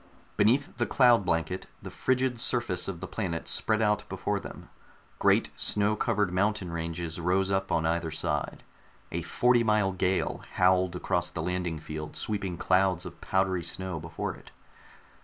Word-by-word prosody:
Beneath 125 +7 +2
the 120 - 0
cloud 120 -5 +5
blanket, 80 +2 -1
the - - -9
frigid 130 -2 0
surface 120 -9 +1
of 90 -4 -5
the 95 - -5
planet 90 -6 -3
spread 110 0 +2
out 105 0 +2
before - - -2
them. - - -10 0.5
Great - - +3
snow 105 +1 +1
covered 105 -3 0
mountain 95 -1 0
ranges 85 0 -4
rose 95 +3 +1
up 95 0 0
on 80 - +1
either 85 0 0
side. 80 - -2 0.5
A 85 - -2
forty 120 +8 +3
mile 105 -3 +2
gale 95 0 0
howled 90 0 +3
across 90 -1 0
the 80 -2 -4
landing 90 -2 -2
field, 75 0 -7
sweeping 100 -5 -2
clouds 95 0 +2
of 85 -1 -10
powdery 95 -2 +1
snow 90 0 -4
before 85 +2 -4
it. - - -15
95 Hz, 160 wpm, -28 LUFS, 85-105 Hz, 0.5 s, cloud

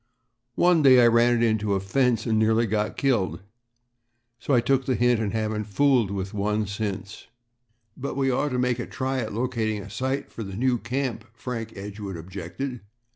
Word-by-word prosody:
One 175 -2 +4
day 130 -3 +7
I 120 - +7
ran 120 +1 +4
it 120 - +1
into 105 -3 +1
a - - +1
fence 115 +3 +1
and 110 -2 +1
nearly 110 +1 +3
got 105 0 -1
killed, 95 - 0 1.0
so 135 - +1
I - - +5
took 130 +2 +1
the 130 - +2
hint 120 -1 +3
and 105 -3 -1
haven't 110 -1 -2
fooled 120 0 +2
with 95 0 -4
one 105 +1 0
since." 100 0 -5 0.7
"But 140 0 -5
we 135 -1 +2
ought 145 +4 0
to 125 - -2
make 125 -1 +1
a 120 - -4
try 130 0 -2
at 110 -3 -3
locating 110 -2 -1
a 100 0 -9
site 130 +6 -2
for - - -8
the 95 -3 -6
new 125 0 +1
camp," 120 -1 -3
Frank 115 -2 -5
Edgewood 100 -1 -6
objected. 95 +9 -6
115 Hz, 185 wpm, -25 LUFS, 105-125 Hz, 1.0 s, day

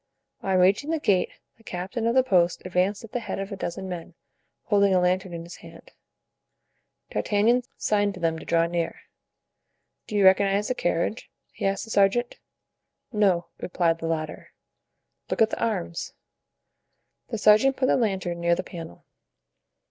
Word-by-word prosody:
On 190 -1 +1
reaching 195 +11 +3
the 325 -1 0
gate 190 -10 +2 0.3
the 225 - -23
captain 195 +5 -3
of 235 - +1
the 260 - +5
post 180 -8 +2
advanced 185 +3 0
at 225 - -11
the 245 - -2
head 230 - -5
of 195 +1 -5
a - - -3
dozen 190 0 -5
men, 175 -3 -7 0.5
holding 200 -2 +3
a - - +5
lantern 185 +1 +1
in 170 -1 -6
his 170 +1 -10
hand. - - -14 1.2
D'Artagnan 220 +4 +2 0.2
signed 205 -1 +1
to - - -9
them 165 -2 0
to - - -11
draw 165 0 +2
near. 170 0 -3 1.1
"Do 210 - -5
you 200 -2 +4
recognize 195 +2 +4
the - - +2
carriage?" 175 -1 -2 0.2
he - - -2
asked 195 0 -1
the 225 - -9
sergeant. 205 +5 +2 0.7
"No," 190 -5 +2
replied 170 -2 0
the 165 - -3
latter. 155 -1 -4 0.8
"Look - - -2
at 225 0 +4
the - - -3
arms." 185 -7 -3 1.1
The 225 - -4
sergeant 215 +6 +5
put 260 - +1
the - - +3
lantern 190 -7 -1
near 170 0 +3
the 185 - -3
panel. 165 - -10
195 Hz, 165 wpm, -25 LUFS, 175-215 Hz, 1.2 s, the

